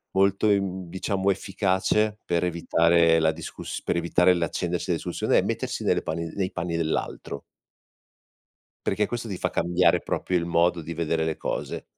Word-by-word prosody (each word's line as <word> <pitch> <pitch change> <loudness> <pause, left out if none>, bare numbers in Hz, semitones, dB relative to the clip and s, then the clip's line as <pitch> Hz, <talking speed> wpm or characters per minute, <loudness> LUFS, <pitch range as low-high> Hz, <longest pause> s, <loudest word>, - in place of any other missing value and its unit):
molto, 100 +2 +3
ehm, 95 -3 0
diciamo, 95 +1 0
efficace, 100 +2 0
per 85 0 0
evitare 85 -1 +3
la 80 0 +3
discuss 80 +1 -7
per - - -1
evitare 85 +1 +3
l'accendersi 85 0 -2
della - - +1
discussione - - +1
è - - +3
mettersi - - -3
nelle - - +1
panni 80 +1 -3
nei 95 -2 -1
panni 85 -1 -3
dell'altro. 80 -3 -3 1.4
Perché 105 +2 +1
questo 120 +1 -4
ti 95 -4 -4
fa - - -1
cambiare 90 +1 +2
proprio 90 - -1
il 85 - -1
modo 85 0 +2
di 85 +2 -6
vedere 80 0 -1
le 80 -1 -1
cose. - - -4
90 Hz, 160 wpm, -25 LUFS, 85-95 Hz, 1.4 s, molto